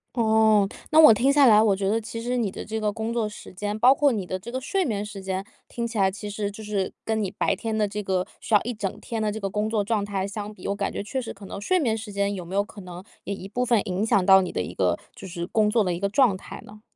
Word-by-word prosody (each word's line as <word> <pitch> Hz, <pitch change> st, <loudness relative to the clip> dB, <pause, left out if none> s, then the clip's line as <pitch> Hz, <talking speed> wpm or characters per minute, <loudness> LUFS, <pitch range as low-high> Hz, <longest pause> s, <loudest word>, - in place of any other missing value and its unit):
哦， 220 Hz, -3 st, +4 dB, 0.2 s
那 315 Hz, -, +7 dB
我 305 Hz, -8 st, +9 dB
听 265 Hz, +6 st, +3 dB
下 280 Hz, -2 st, +6 dB
来， 215 Hz, -2 st, +7 dB
我 205 Hz, -3 st, +3 dB
觉 195 Hz, 0 st, -1 dB
得 220 Hz, +3 st, +2 dB
其 230 Hz, +1 st, -6 dB
实 245 Hz, +2 st, -2 dB
你 225 Hz, -5 st, 0 dB
的 -, -, -7 dB
这 220 Hz, +1 st, -3 dB
个 210 Hz, -1 st, 0 dB
工 225 Hz, +1 st, -3 dB
作 230 Hz, -2 st, 0 dB
时 210 Hz, -, -9 dB
间， 205 Hz, +3 st, -4 dB
包 255 Hz, +4 st, +6 dB
括 285 Hz, -1 st, +3 dB
你 200 Hz, -5 st, -3 dB
的 185 Hz, -, -3 dB
这 230 Hz, +6 st, -9 dB
个 260 Hz, -, -2 dB
睡 370 Hz, +8 st, 0 dB
眠 205 Hz, -5 st, -2 dB
时 210 Hz, -2 st, -8 dB
间， 190 Hz, 0 st, -2 dB, 0.3 s
听 235 Hz, -1 st, -3 dB
起 230 Hz, -1 st, -6 dB
来 195 Hz, -1 st, +3 dB
其 205 Hz, +2 st, -7 dB
实 205 Hz, 0 st, -3 dB
就 210 Hz, +2 st, -10 dB
是 205 Hz, -3 st, -2 dB
跟 220 Hz, -1 st, -1 dB
你 195 Hz, -, -2 dB
白 195 Hz, -1 st, 0 dB
天 220 Hz, +1 st, -3 dB
的 210 Hz, -1 st, +1 dB
这 210 Hz, +1 st, -4 dB
个 185 Hz, -2 st, -1 dB
需 -, -, -8 dB
要 205 Hz, -, +7 dB
一 245 Hz, 0 st, -4 dB
整 200 Hz, -3 st, -4 dB
天 225 Hz, -2 st, -4 dB
的 210 Hz, -1 st, 0 dB
这 220 Hz, -, -5 dB
个 195 Hz, -, -2 dB
工 210 Hz, +2 st, -2 dB
作 220 Hz, -2 st, +1 dB
状 210 Hz, 0 st, 0 dB
态 195 Hz, -2 st, -2 dB
相 210 Hz, 0 st, -6 dB
比， 210 Hz, -, -8 dB
我 200 Hz, -, -1 dB
感 200 Hz, -1 st, -2 dB
觉 -, -, -4 dB
确 260 Hz, +6 st, -4 dB
实 240 Hz, -, -6 dB
可 195 Hz, 0 st, -12 dB
能 -, -, -7 dB
睡 365 Hz, -, +1 dB
眠 230 Hz, -8 st, +1 dB
时 215 Hz, -1 st, -7 dB
间， 200 Hz, 0 st, 0 dB
有 180 Hz, -, -6 dB
没 175 Hz, +3 st, -8 dB
有 200 Hz, -, +3 dB
可 205 Hz, -1 st, -11 dB
能 180 Hz, 0 st, -9 dB, 0.2 s
也 200 Hz, -, -4 dB
一 190 Hz, 0 st, -8 dB
部 250 Hz, +5 st, -1 dB
分 235 Hz, -3 st, +3 dB
影 185 Hz, +3 st, -1 dB
响 205 Hz, -5 st, +2 dB
到 190 Hz, 0 st, +7 dB
你 185 Hz, -, -4 dB
的 -, -, -2 dB
一 -, -, -4 dB
个 -, -, +1 dB, 0.2 s
就 195 Hz, -, -9 dB
是 170 Hz, -1 st, -5 dB
工 210 Hz, +1 st, +2 dB
作 225 Hz, -1 st, +3 dB
的 180 Hz, -3 st, -1 dB
一 -, -, -4 dB
个 200 Hz, +2 st, -1 dB
状 225 Hz, -3 st, +4 dB
态 -, -, -10 dB
呢？ 210 Hz, +1 st, -14 dB
210 Hz, 335 characters per minute, -25 LUFS, 195-225 Hz, 0.3 s, 我